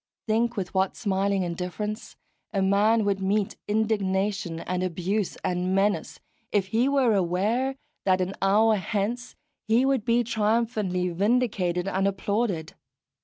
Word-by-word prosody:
Think 230 +1 +1
with 185 -2 -3
what 190 0 +1
smiling 195 -2 0
indifference 180 +5 -4 0.4
a 195 -3 0
man 210 +3 +3
would 195 -1 0
meet 200 +1 0
indignation 200 -4 0
and 180 0 -2
abuse 185 +3 -1
and 180 +1 0
menace, 200 +1 0 0.3
if 195 -2 +1
he 235 +6 +2
were 270 -5 +3
aware 205 +8 0 0.3
that 185 -1 +3
an 185 +1 -1
hour 215 +3 +4
hence 220 +5 -3 0.3
he 230 +4 +4
would 270 -5 +1
be 235 +1 +2
triumphantly 215 -5 0
vindicated 195 -2 0
and 195 0 +1
applauded. 200 -3 -1
200 Hz, 130 wpm, -26 LUFS, 190-220 Hz, 0.4 s, hour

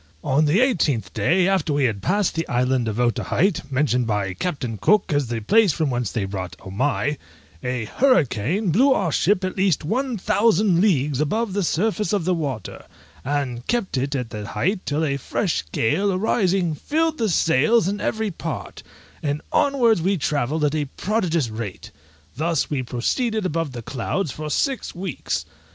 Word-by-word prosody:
On 145 +4 +2
the 165 +10 +3
eighteenth 160 - +1
day 170 - +2
after 185 -6 +1
we 145 -1 +1
had 110 -6 0
passed 200 0 +1
the 165 0 -2
Island 125 0 +1
of 110 +1 -2
Otaheite, 140 - 0
mentioned 130 -3 +1
by 100 -3 -1
Captain 125 - -3
Cook 210 -6 +3
as 145 -3 +1
the 115 -1 -3
place 210 - +4
from 155 -3 0
whence 120 -4 -1
they 105 -4 -1
brought 95 -2 -5
Omai, 140 +8 -1 0.4
a 125 -2 -2
hurricane 175 - +1
blew 265 - +5
our 180 -9 0
ship 190 +5 +2
at 185 - -2
least 190 -6 +1
one 250 - -1
thousand 200 -2 +3
leagues 150 -8 +2
above 210 +7 -1
the 200 - 0
surface 210 +5 0
of 195 -5 0
the 185 - +2
water, 140 - -4 0.4
and 135 -3 -2
kept 235 -9 -1
it 135 +2 -1
at 125 -4 -3
the 105 -1 -6
height 180 - -1
till 150 +2 0
a 140 -2 0
fresh 155 - -1
gale 180 - +1
arising 185 -3 +1
filled 315 - -1
the 225 -2 +1
sails 165 - +3
in 205 +1 -2
every 220 -2 -1
part, 165 -2 -6 0.4
and 145 0 -1
onwards 240 -9 +3
we 190 +3 +1
travelled 150 0 -1
at 145 - +1
a 150 -2 0
prodigious 175 - 0
rate; 110 -4 -6 0.4
thus 160 +2 0
we 140 -3 0
proceeded 215 - -1
above 165 -4 -1
the 120 -2 -7
clouds 140 - -2
for 155 +3 -6
six 265 - -1
weeks. 180 -4 -3
155 Hz, 170 wpm, -22 LUFS, 130-200 Hz, 0.4 s, blew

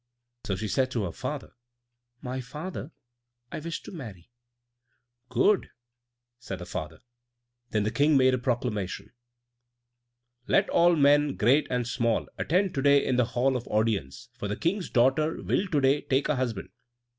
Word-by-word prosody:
So 95 - 0
she 110 +3 -4
said 130 +7 +1
to 120 -4 -2
her 90 - -3
father, - - -5 0.7
"My 130 +1 -4
father; 150 +4 -7 0.6
I - - -4
wish 165 +2 -5
to - - -9
marry." 115 - -10 1.0
"Good," 155 - +2 0.7
said 100 -6 -6
her 90 - -8
father. 80 -3 -6 0.7
Then 105 -1 0
the 105 - -1
King 145 +5 +3
made 130 -1 +4
a 130 - +1
proclamation: 110 -5 -3 1.3
"Let - - +3
all 175 0 +5
men, 145 -1 +4
great 130 +7 +3
and 125 -2 -1
small, 115 -2 0
attend 185 +3 +1
to 135 - -1
day 140 0 +4
in 125 - +1
the 125 - +4
hall 130 +3 0
of 125 -1 -4
audience, 105 -11 -1
for 100 - -5
the 105 - -3
King's 180 +3 -1
daughter 135 +6 +2
will 200 - 0
to 155 -5 +1
day 135 +2 +3
take 135 +1 0
a 150 - +2
husband." 120 -6 -3
130 Hz, 160 wpm, -27 LUFS, 110-145 Hz, 1.3 s, all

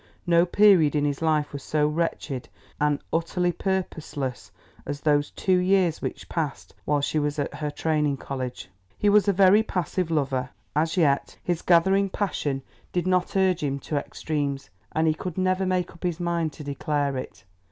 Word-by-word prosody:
No 170 0 +4
period 175 -6 +5
in 145 -1 +2
his 145 0 -1
life 155 -3 +1
was 140 - -5
so 150 +1 +1
wretched 150 -4 -2 0.3
and 150 -1 +2
utterly 175 +2 +1
purposeless 160 -8 -3 0.3
as 145 0 -5
those 145 -1 +2
two 185 -1 +1
years 180 -3 +2
which - - -5
passed 155 -5 -4
while 145 -1 +1
she 155 +2 0
was 145 0 -1
at 145 - -2
her 150 0 -3
Training 150 -1 0
College. 130 -7 -5 0.3
He 205 - +2
was 205 -1 +5
a - - +5
very 195 +2 +6
passive 180 -3 -2
lover, 135 -4 0 0.3
as 160 +3 +1
yet 140 -5 +2
his 175 -2 -1
gathering 190 +3 +4
passion 145 -9 -2 0.3
did 180 -1 -1
not 185 +1 +1
urge 185 -2 +2
him 140 -2 -1
to 150 - -3
extremes, 140 -1 -3 0.2
and 160 - +1
he 155 - +4
could 175 +2 -6
never 185 0 +1
make 180 -1 0
up 170 - -17
his 175 -2 -2
mind 170 -2 0
to 150 - -9
declare 145 0 -1
it. 130 - -7
160 Hz, 175 wpm, -25 LUFS, 145-180 Hz, 0.3 s, very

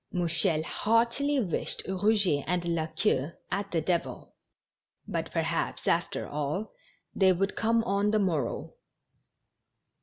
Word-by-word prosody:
Mou 175 -2 0
chel 160 -1 +2
heartily 235 - +1
wished 185 -10 -1
Eouget 190 -6 +2
and 175 0 0
La 160 -1 -1
Queue 160 -3 0 0.2
at 200 +1 -2
the 165 -4 0
devil; 160 -7 -2 0.7
but, - - -3
perhaps, - - -2
after - - 0
all, 150 +8 -3 0.4
they 190 -1 +4
would 195 +2 0
come 230 0 +2
on 200 -1 +1
the 215 - +2
morrow. 180 -8 -1
190 Hz, 125 wpm, -29 LUFS, 160-215 Hz, 0.7 s, they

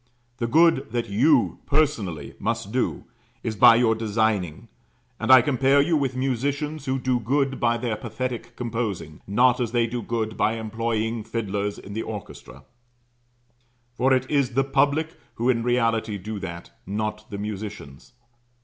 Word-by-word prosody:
The 115 - -1
good 165 +2 +4
that 120 -2 -1
you 130 +6 +3
personally 140 - 0
must 100 - -2
do 125 +1 -1 0.4
is 110 -2 -2
by 115 - +8
your 115 -1 +3
designing; 110 -6 -1 0.5
and - - +1
I 130 -2 +9
compare 135 +1 +3
you 160 +4 +3
with 135 -4 0
musicians 140 +3 -2
who 130 0 0
do 130 -1 0
good 135 +3 0
by 120 0 +2
their 115 -2 -2
pathetic 120 +3 -5
composing, 115 -10 -4
not 120 +5 +3
as 120 -2 -2
they 120 -1 +3
do 120 +1 -4
good 110 -1 -3
by 110 - +1
employing 115 0 -2
fiddlers 105 -2 -3
in 100 - -10
the 110 - -2
orchestra; 105 -3 -8 1.3
for 130 +2 +1
it 130 -1 +3
is 135 -4 0
the 135 - +4
public 145 +4 +1 0.2
who 120 +3 +2
in 115 -2 -1
reality 115 -3 +1
do 105 +2 -6
that, 85 -2 -7 0.2
not 105 +1 -3
the 100 - -5
musicians. 105 - -7
115 Hz, 155 wpm, -24 LUFS, 110-130 Hz, 1.3 s, I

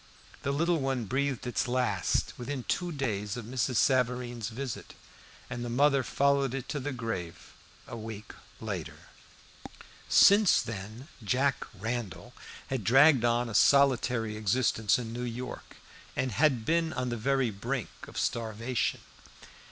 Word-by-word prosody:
The 140 - -1
little 165 +4 +1
one 135 -4 -1
breathed 130 +2 -1
its 125 +1 -1
last 120 -6 0
within 130 +1 -5
two 175 +6 -1
days 110 - -2
of 120 - -6
Mrs. 125 +1 -1
Savareen's 125 -2 +1
visit, 125 +1 -6 0.5
and 120 -1 -5
the 120 - -4
mother 140 +3 +3
followed 140 0 +1
it 135 -1 -5
to 150 - -2
the 145 +2 -3
grave 115 -9 -5 0.3
a - - -7
week 110 -2 -8 0.3
later. - - -5 1.1
Since 200 -1 +6
then 110 +4 -7 0.2
"Jack 130 +5 0
Randall" 115 -2 -4 0.4
had 130 -5 -1
dragged 135 +3 +6
on 120 0 +2
a 115 - -6
solitary 125 -2 +3
existence 110 0 +2
in 115 -2 -5
New 120 - -4
York, 125 +1 -6 0.4
and 130 - -1
had 130 -2 +2
been 165 +1 +1
on 125 -1 -2
the 120 - -2
very 130 +1 +1
brink 115 +3 -3 0.2
of - - -11
starvation. 115 +2 -1
125 Hz, 140 wpm, -29 LUFS, 115-135 Hz, 1.1 s, Since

